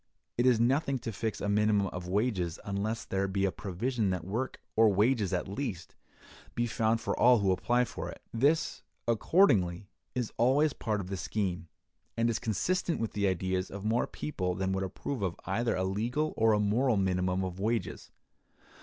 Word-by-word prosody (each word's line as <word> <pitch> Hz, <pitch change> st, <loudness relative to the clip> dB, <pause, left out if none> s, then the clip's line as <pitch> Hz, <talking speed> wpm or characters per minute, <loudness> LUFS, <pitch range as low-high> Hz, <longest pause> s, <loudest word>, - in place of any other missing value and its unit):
It 120 Hz, +1 st, +2 dB
is 120 Hz, -3 st, +4 dB
nothing 135 Hz, +3 st, +2 dB
to 115 Hz, -2 st, -5 dB
fix 110 Hz, +2 st, -3 dB
a -, -, -1 dB
minimum 105 Hz, 0 st, +3 dB
of 90 Hz, 0 st, -6 dB
wages 95 Hz, -4 st, 0 dB
unless 105 Hz, +3 st, -2 dB
there 95 Hz, 0 st, -1 dB
be 95 Hz, 0 st, 0 dB
a 95 Hz, -, +1 dB
provision 105 Hz, +5 st, -2 dB
that 90 Hz, -3 st, -2 dB
work, 115 Hz, +8 st, -3 dB, 0.2 s
or 110 Hz, -1 st, +6 dB
wages 105 Hz, 0 st, +2 dB
at 90 Hz, -, -1 dB
least, 100 Hz, -, -5 dB, 0.6 s
be 120 Hz, -, +1 dB
found 115 Hz, 0 st, +1 dB
for -, -, -2 dB
all 125 Hz, 0 st, +7 dB
who 100 Hz, -3 st, +2 dB
apply 120 Hz, +6 st, +2 dB
for -, -, -6 dB
it. -, -, -9 dB
This, 145 Hz, +7 st, +1 dB, 0.3 s
accordingly, 105 Hz, -, +3 dB, 0.2 s
is 125 Hz, -3 st, -2 dB
always 135 Hz, +5 st, +3 dB
part 105 Hz, -2 st, -2 dB
of 90 Hz, -, -8 dB
the 95 Hz, -, -2 dB
scheme, 90 Hz, -1 st, -2 dB, 0.5 s
and 115 Hz, +1 st, +2 dB
is 115 Hz, -, -2 dB
consistent 170 Hz, -, 0 dB
with 115 Hz, -, -2 dB
the 100 Hz, -1 st, +1 dB
ideas 95 Hz, 0 st, -1 dB
of 100 Hz, +1 st, -7 dB
more 115 Hz, +3 st, +1 dB
people 90 Hz, -12 st, -3 dB
than 95 Hz, 0 st, -1 dB
would 95 Hz, 0 st, -1 dB
approve 105 Hz, +6 st, -4 dB
of 90 Hz, -3 st, -1 dB
either 115 Hz, +5 st, 0 dB
a 95 Hz, -, 0 dB
legal 120 Hz, +11 st, -1 dB
or 110 Hz, 0 st, +4 dB
a 105 Hz, -, +2 dB
moral 110 Hz, +3 st, +2 dB
minimum 90 Hz, -1 st, +1 dB
of 95 Hz, 0 st, -5 dB
wages. 110 Hz, +3 st, -2 dB
105 Hz, 185 wpm, -30 LUFS, 95-120 Hz, 0.6 s, all